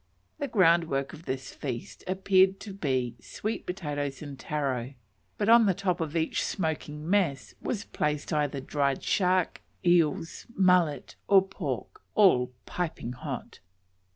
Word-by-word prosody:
The 285 Hz, -, -1 dB
groundwork 165 Hz, -, +3 dB
of 160 Hz, +2 st, -11 dB
this 130 Hz, 0 st, -4 dB
feast 125 Hz, -5 st, -6 dB
appeared 190 Hz, 0 st, +3 dB
to 200 Hz, -2 st, -7 dB
be 130 Hz, -10 st, -1 dB
sweet 215 Hz, -, -5 dB
potatoes 145 Hz, -6 st, -3 dB
and 140 Hz, -2 st, -8 dB
taro, 135 Hz, -4 st, -2 dB, 0.4 s
but 205 Hz, -, 0 dB
on 230 Hz, -1 st, +7 dB
the 190 Hz, -, +3 dB
top 185 Hz, -2 st, -1 dB
of 160 Hz, 0 st, -3 dB
each 160 Hz, 0 st, 0 dB
smoking 155 Hz, -3 st, -3 dB
mess 175 Hz, -9 st, +1 dB
was 205 Hz, -4 st, -2 dB
placed 150 Hz, -6 st, -2 dB
either 145 Hz, -2 st, 0 dB
dried 140 Hz, 0 st, 0 dB
shark, 185 Hz, -2 st, +1 dB, 0.2 s
eels, 165 Hz, -2 st, +2 dB
mullet, 180 Hz, -7 st, +2 dB
or 195 Hz, -1 st, +7 dB
pork, 310 Hz, -, -5 dB
all 130 Hz, -13 st, +5 dB
"piping 165 Hz, -9 st, -3 dB
hot." 125 Hz, -, -6 dB
165 Hz, 135 wpm, -28 LUFS, 140-190 Hz, 0.4 s, on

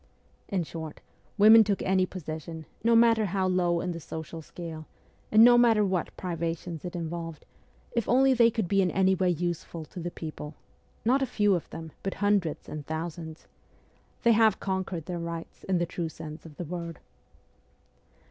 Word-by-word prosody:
In 190 Hz, -4 st, -1 dB
short, 160 Hz, -1 st, -7 dB, 0.4 s
women 220 Hz, +2 st, +9 dB
took 200 Hz, -2 st, -1 dB
any 185 Hz, -1 st, +2 dB
position, 160 Hz, -2 st, -7 dB, 0.2 s
no 230 Hz, 0 st, +4 dB
matter 230 Hz, -1 st, +5 dB
how 190 Hz, 0 st, 0 dB
low 175 Hz, -2 st, +1 dB
in 180 Hz, -, -2 dB
the 170 Hz, -, -5 dB
social 160 Hz, +1 st, -7 dB
scale, 160 Hz, -1 st, -8 dB, 0.4 s
and 215 Hz, +1 st, +8 dB
no 240 Hz, 0 st, +8 dB
matter 225 Hz, -3 st, +5 dB
what 185 Hz, -3 st, -2 dB
privations 170 Hz, -2 st, -4 dB
it 180 Hz, 0 st, -6 dB
involved, 165 Hz, -2 st, -5 dB, 0.5 s
if 235 Hz, -3 st, -1 dB
only 265 Hz, +2 st, +5 dB
they 235 Hz, -2 st, +5 dB
could 225 Hz, -5 st, -2 dB
be 195 Hz, +2 st, +3 dB
in 185 Hz, -, +2 dB
any 190 Hz, +1 st, +3 dB
way 185 Hz, -1 st, +1 dB
useful 170 Hz, -1 st, -3 dB
to 180 Hz, -, -10 dB
the 175 Hz, +1 st, -3 dB
people; 155 Hz, -2 st, -7 dB, 0.5 s
not 260 Hz, +4 st, +3 dB
a 270 Hz, -, +1 dB
few 205 Hz, -3 st, +2 dB
of 175 Hz, -, -2 dB
them, 160 Hz, -1 st, -8 dB
but 195 Hz, -, -3 dB
hundreds 200 Hz, -6 st, 0 dB
and 150 Hz, -2 st, -7 dB
thousands. 160 Hz, 0 st, -5 dB, 0.8 s
They 235 Hz, -, +6 dB
have 220 Hz, -2 st, +4 dB
conquered 190 Hz, -4 st, -3 dB
their 175 Hz, -1 st, -4 dB
rights 170 Hz, 0 st, -6 dB
in 190 Hz, -1 st, +1 dB
the 175 Hz, -, +1 dB
true 170 Hz, -1 st, -4 dB
sense 160 Hz, 0 st, -9 dB
of 150 Hz, -, -15 dB
the 175 Hz, -, -4 dB
word. 170 Hz, 0 st, -5 dB
175 Hz, 175 wpm, -28 LUFS, 165-205 Hz, 0.8 s, women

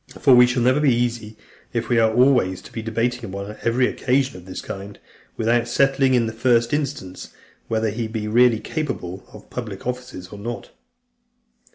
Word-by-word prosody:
For 135 Hz, -, +5 dB
we 125 Hz, 0 st, +8 dB
never -, -, 0 dB
shall 130 Hz, +3 st, +3 dB
be 140 Hz, -5 st, +3 dB
easy, 115 Hz, -3 st, -2 dB, 0.4 s
if 115 Hz, -2 st, -2 dB
we 120 Hz, 0 st, +3 dB
are 110 Hz, -1 st, +4 dB
always 120 Hz, -6 st, +3 dB
to -, -, -13 dB
be 115 Hz, -, -5 dB
debating 115 Hz, +2 st, -1 dB
upon 100 Hz, 0 st, -6 dB
every 120 Hz, +2 st, +2 dB
occasion 130 Hz, -1 st, 0 dB
of 90 Hz, -1 st, -11 dB
this 95 Hz, -, -7 dB
kind, 100 Hz, +1 st, -8 dB, 0.4 s
without 115 Hz, +1 st, +1 dB
settling, 135 Hz, +1 st, +3 dB
in 120 Hz, -2 st, +3 dB
the 110 Hz, -, -4 dB
first 115 Hz, +1 st, +2 dB
instance, 140 Hz, -11 st, -3 dB, 0.4 s
whether 110 Hz, -1 st, 0 dB
he 115 Hz, +2 st, -3 dB
be 110 Hz, -1 st, -4 dB
really 120 Hz, +1 st, +4 dB
capable 100 Hz, -, -4 dB
of -, -, -14 dB
public 110 Hz, -6 st, -6 dB
offices 125 Hz, -7 st, -5 dB
or 105 Hz, -, -10 dB
not. 115 Hz, +3 st, -6 dB
115 Hz, 180 wpm, -22 LUFS, 110-125 Hz, 0.4 s, we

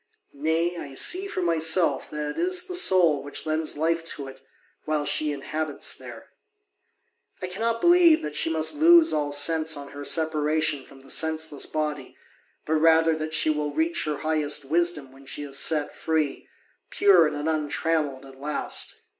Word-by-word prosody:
Nay, 160 Hz, +4 st, -1 dB
I 140 Hz, -4 st, -8 dB
see 370 Hz, -, +2 dB
for 185 Hz, -, -4 dB
myself 165 Hz, -3 st, +1 dB
that 150 Hz, -1 st, -4 dB
it -, -, -11 dB
is 360 Hz, +1 st, +2 dB
the 370 Hz, -, -7 dB
soul 180 Hz, -, +3 dB
which 145 Hz, +2 st, -5 dB
lends 155 Hz, -1 st, -2 dB
life 165 Hz, +2 st, 0 dB
to 140 Hz, -3 st, -8 dB
it, 135 Hz, 0 st, -12 dB, 0.4 s
while 155 Hz, -1 st, -1 dB
she 150 Hz, +1 st, 0 dB
inhabits 150 Hz, +1 st, -2 dB
there. -, -, -12 dB, 1.1 s
I 185 Hz, -, -4 dB
cannot 225 Hz, +5 st, -3 dB
believe 345 Hz, -2 st, +5 dB
that 150 Hz, -1 st, -5 dB
she 150 Hz, -, +1 dB
must 160 Hz, -, +1 dB
lose 325 Hz, +2 st, +5 dB
all 145 Hz, -1 st, -1 dB
sense 155 Hz, +2 st, +2 dB
on 140 Hz, 0 st, -9 dB
her 145 Hz, 0 st, -9 dB
separation 155 Hz, -2 st, 0 dB
from 135 Hz, -1 st, -17 dB
the 135 Hz, -, -8 dB
senseless 160 Hz, -2 st, 0 dB
body, 150 Hz, -3 st, -4 dB, 0.5 s
but 160 Hz, +1 st, 0 dB
rather 165 Hz, 0 st, +4 dB
that 155 Hz, 0 st, -4 dB
she 155 Hz, +1 st, +2 dB
will 150 Hz, -1 st, -3 dB
reach 330 Hz, +1 st, 0 dB
her 150 Hz, -1 st, -2 dB
highest 150 Hz, -2 st, -1 dB
wisdom 160 Hz, -2 st, 0 dB
when 135 Hz, 0 st, -17 dB
she 145 Hz, -, -5 dB
is 140 Hz, -1 st, -3 dB
set 150 Hz, -3 st, 0 dB
free, 155 Hz, -3 st, -2 dB, 0.4 s
pure 405 Hz, 0 st, +4 dB
and 145 Hz, +1 st, -4 dB
untrammelled 150 Hz, -2 st, -2 dB
at 135 Hz, -1 st, -15 dB
last. 150 Hz, +1 st, -2 dB
155 Hz, 170 wpm, -25 LUFS, 145-165 Hz, 1.1 s, believe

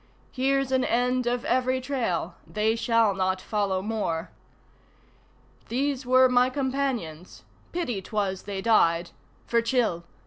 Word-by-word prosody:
Here's 270 Hz, 0 st, 0 dB
an 260 Hz, -1 st, +2 dB
end 250 Hz, +1 st, +1 dB
of 245 Hz, +2 st, -1 dB
every 255 Hz, -1 st, +1 dB
trail 240 Hz, -10 st, -2 dB
they 215 Hz, +1 st, 0 dB
shall 230 Hz, -2 st, +2 dB
not 190 Hz, 0 st, 0 dB
follow 195 Hz, -1 st, -1 dB
more. 200 Hz, -6 st, -2 dB, 1.4 s
These 270 Hz, +1 st, -1 dB
were 255 Hz, +1 st, +6 dB
my 250 Hz, 0 st, +3 dB
companions. 260 Hz, -, -3 dB, 0.3 s
Pity 250 Hz, -, -2 dB
'twas 190 Hz, -1 st, -2 dB
they 195 Hz, -1 st, -5 dB
died! 170 Hz, -6 st, +3 dB, 0.3 s
(For 235 Hz, 0 st, +2 dB
Chil! 230 Hz, -8 st, 0 dB
230 Hz, 125 wpm, -26 LUFS, 190-255 Hz, 1.4 s, were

